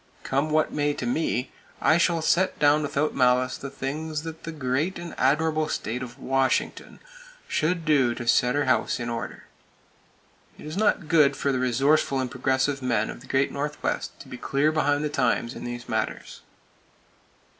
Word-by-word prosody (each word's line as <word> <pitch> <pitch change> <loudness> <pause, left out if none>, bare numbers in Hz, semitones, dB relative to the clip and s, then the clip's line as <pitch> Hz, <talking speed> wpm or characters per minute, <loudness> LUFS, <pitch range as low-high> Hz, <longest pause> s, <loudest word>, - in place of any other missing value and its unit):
Come 140 +3 0
what 155 0 +1
may 145 -1 0
to - - -4
me, 125 0 -1 0.3
I 160 - +4
shall 165 -1 +2
set 185 +3 +2
down 145 +1 +4
without 150 +1 -1
malice 125 0 +2
the 140 - -7
things 150 +3 -4
that 160 0 -8
the 165 - -4
great 150 +4 -1
and 170 0 -7
admirable 155 +3 +1
State 120 +3 -3
of 125 -2 -8
Washington 135 0 -1 0.5
should 165 +1 0
do 135 -6 +3
to 120 -1 -6
set 125 +2 +3
her 145 - +1
house 125 -2 +1
in 120 0 -3
order. 115 -1 -5 1.1
It - - -12
is 155 +1 -6
not 205 -5 +1
good 150 -4 +4
for 140 - 0
the 130 - 0
resourceful 135 +3 +2
and 130 -2 -2
progressive 130 +2 0
men 120 -4 0
of - - -11
the 135 - -14
Great 135 +1 +1
Northwest 145 +1 -3
to - - -12
be 125 - -8
clear 140 +5 +1
behind 145 -1 +1
the - - +1
times 125 -3 0
in - - -8
these 120 0 -6
matters. 110 -1 -3
140 Hz, 175 wpm, -25 LUFS, 125-155 Hz, 1.1 s, I